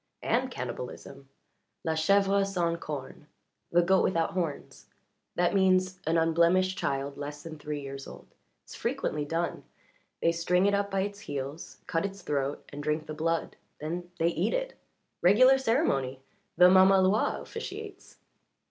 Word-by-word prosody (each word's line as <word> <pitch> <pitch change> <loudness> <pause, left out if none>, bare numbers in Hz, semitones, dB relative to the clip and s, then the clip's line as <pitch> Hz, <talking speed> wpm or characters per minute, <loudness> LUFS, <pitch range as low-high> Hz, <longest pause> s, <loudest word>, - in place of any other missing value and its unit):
"And - - +1
cannibalism. 135 +2 -7 0.5
La 160 - 0
chèvre 195 +5 +3
sans 175 -4 -1
cornes 150 -1 -7 0.4
the 175 0 +4
goat 190 +1 +4
without 165 -3 +1
horns 170 -5 -4 0.5
that 175 0 +2
means 185 -1 +2
an 165 +1 +2
unblemished 170 +3 +3
child 140 -2 -2
less 145 0 -6
than 155 -2 -8
three 150 0 -4
years 135 0 -7
old. - - -11 0.4
It's - - -13
frequently 150 -1 -2
done. 165 +3 -2 0.6
They 165 - +3
string 180 +2 +1
it 200 - +3
up 200 0 +1
by 195 -1 0
its 200 +1 -4
heels, 145 -2 -6
cut 165 +1 -1
its 200 -1 -5
throat, 140 -2 -2
and 145 - -7
drink 150 +1 -1
the 155 - -6
blood. 165 +2 -2 0.2
Then 175 +3 -5
they 165 -1 +2
eat 170 - 0
it. - - -2 0.5
Regular 255 +9 +6
ceremony 135 - 0 0.3
the 180 - +8
mamaloi 190 +2 +4
officiates." 420 -3 -8
170 Hz, 150 wpm, -29 LUFS, 150-195 Hz, 0.6 s, the